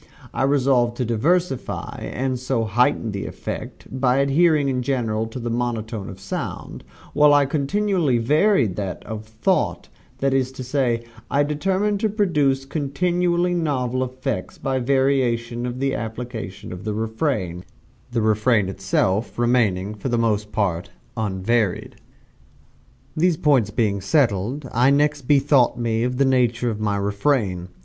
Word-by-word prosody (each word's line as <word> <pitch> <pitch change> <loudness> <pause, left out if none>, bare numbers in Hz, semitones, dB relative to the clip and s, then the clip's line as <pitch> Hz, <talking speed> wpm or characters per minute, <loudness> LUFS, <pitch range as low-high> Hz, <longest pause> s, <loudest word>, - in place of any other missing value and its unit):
I - - -2
resolved 130 -3 +2
to 125 - -1
diversify, 135 +6 -1
and 130 -1 -2
so 125 -2 -1
heighten 115 +2 +1
the 100 -1 -4
effect, - - -7
by 130 -1 +1
adhering 145 +2 +3
in 130 -2 0
general 115 -4 -1
to 110 - -8
the 120 -1 -3
monotone 115 -3 -3
of 95 - -10
sound, 95 -8 -6 0.3
while 150 -1 +6
I 145 -1 +4
continually 155 0 +1
varied 140 - +2
that 95 -4 -4
of 110 -1 -6
thought: 115 - -1 0.3
that 135 0 +1
is 130 -1 +1
to 130 - -7
say, 125 -3 0 0.3
I 145 +1 +2
determined 190 +8 0
to 220 - +1
produce 150 -10 +1
continuously 175 +5 0
novel 130 -7 0
effects, 130 -5 -4
by 135 -1 -1
the 120 - -4
variation 125 -3 +1
of 125 0 -5
the 135 0 0
application 110 -5 -6
of 90 +2 -8
the 105 0 -3
refrain 110 - -2 0.5
the 115 -2 0
refrain 110 -1 +2
itself 95 +2 -1
remaining 110 -5 +1
for 105 +5 -5
the 120 - +1
most 105 -2 0
part, 95 -3 -1 0.3
unvaried. 105 -1 -1 1.2
These 170 0 +2
points 135 -10 +3
being 105 -2 0
settled, 120 +3 +1
I 125 +3 +4
next 145 -1 +1
bethought 140 -4 +4
me 115 -2 0
of 125 +1 -1
the 140 - +3
nature 125 -2 +2
of 105 - -5
my 105 -1 0
refrain. 100 -3 0
125 Hz, 145 wpm, -22 LUFS, 110-140 Hz, 1.2 s, while